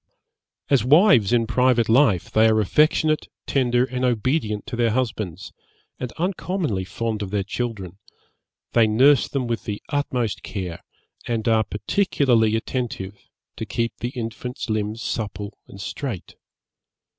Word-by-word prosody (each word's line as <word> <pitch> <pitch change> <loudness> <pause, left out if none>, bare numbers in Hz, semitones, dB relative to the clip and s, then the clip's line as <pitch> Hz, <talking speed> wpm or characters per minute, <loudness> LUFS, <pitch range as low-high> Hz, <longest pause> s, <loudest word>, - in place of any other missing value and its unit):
'As 140 -5 +3
wives 135 - +5
in 120 -2 +3
private 120 0 +2
life, 115 - +3
they 110 +1 +5
are 110 0 +3
affectionate, 155 - +2 0.2
tender 125 -2 +2
and 130 -1 -4
obedient 120 -3 0
to 125 - -5
their 120 -1 +2
husbands, 105 -7 -3 0.5
and 125 -2 -4
uncommonly 175 - -2
fond 110 +2 -3
of 100 - -4
their 100 0 -1
children: 100 -4 -5 0.7
they 115 -2 +5
nurse 130 +5 +5
them 135 -3 -2
with 115 -1 -3
the 105 -1 -3
utmost 125 -6 -1
care, 90 -5 -6 0.4
and 115 -1 -1
are 110 -1 +4
particularly 115 - +1
attentive 110 -4 -3 0.4
to 110 - -4
keep 115 +4 -2
the 120 - -2
infant's 120 0 -5
limbs 110 +1 -2
supple 105 -2 -4
and 95 - -12
straight. 115 - -5
115 Hz, 135 wpm, -23 LUFS, 105-130 Hz, 0.7 s, wives